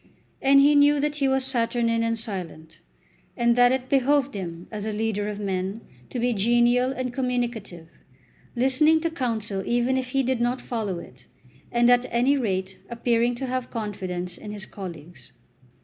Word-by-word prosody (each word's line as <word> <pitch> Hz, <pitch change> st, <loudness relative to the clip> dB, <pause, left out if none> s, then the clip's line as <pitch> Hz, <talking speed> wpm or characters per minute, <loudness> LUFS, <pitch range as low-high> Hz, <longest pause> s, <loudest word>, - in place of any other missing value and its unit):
And 275 Hz, +1 st, +6 dB
he 285 Hz, +2 st, +6 dB
knew 290 Hz, 0 st, +5 dB
that 295 Hz, +1 st, -1 dB
he 275 Hz, -2 st, +1 dB
was 265 Hz, 0 st, +1 dB
saturnine 230 Hz, -2 st, 0 dB
and 230 Hz, 0 st, 0 dB
silent, 175 Hz, -7 st, -7 dB, 0.6 s
and 235 Hz, -1 st, +3 dB
that 245 Hz, 0 st, +5 dB
it 260 Hz, 0 st, -1 dB
behoved 275 Hz, +1 st, +2 dB
him 175 Hz, -3 st, -6 dB
as 210 Hz, -2 st, -5 dB
a 215 Hz, -, -2 dB
leader 210 Hz, -1 st, -1 dB
of 210 Hz, -1 st, -5 dB
men 195 Hz, +1 st, -3 dB, 0.3 s
to -, -, -5 dB
be 245 Hz, 0 st, +1 dB
genial 240 Hz, +4 st, +3 dB
and 255 Hz, -1 st, -4 dB
communicative, 240 Hz, -9 st, -3 dB, 0.7 s
listening 270 Hz, +6 st, +3 dB
to 330 Hz, 0 st, -1 dB
counsel 225 Hz, -9 st, -2 dB
even 245 Hz, +4 st, +1 dB
if 255 Hz, -1 st, -3 dB
he 270 Hz, +1 st, +1 dB
did 255 Hz, -1 st, 0 dB
not 245 Hz, +2 st, 0 dB
follow 215 Hz, -6 st, -3 dB
it, 130 Hz, -6 st, -12 dB, 0.4 s
and 240 Hz, 0 st, +3 dB
at 245 Hz, +1 st, +3 dB
any 245 Hz, +4 st, +2 dB
rate 190 Hz, -7 st, -2 dB
appearing 235 Hz, 0 st, +1 dB
to 265 Hz, -, -4 dB
have 255 Hz, -1 st, -3 dB
confidence 185 Hz, -5 st, -5 dB
in 210 Hz, -, -8 dB
his 205 Hz, -2 st, -7 dB
colleagues. 170 Hz, -6 st, -10 dB
235 Hz, 170 wpm, -25 LUFS, 205-255 Hz, 0.7 s, And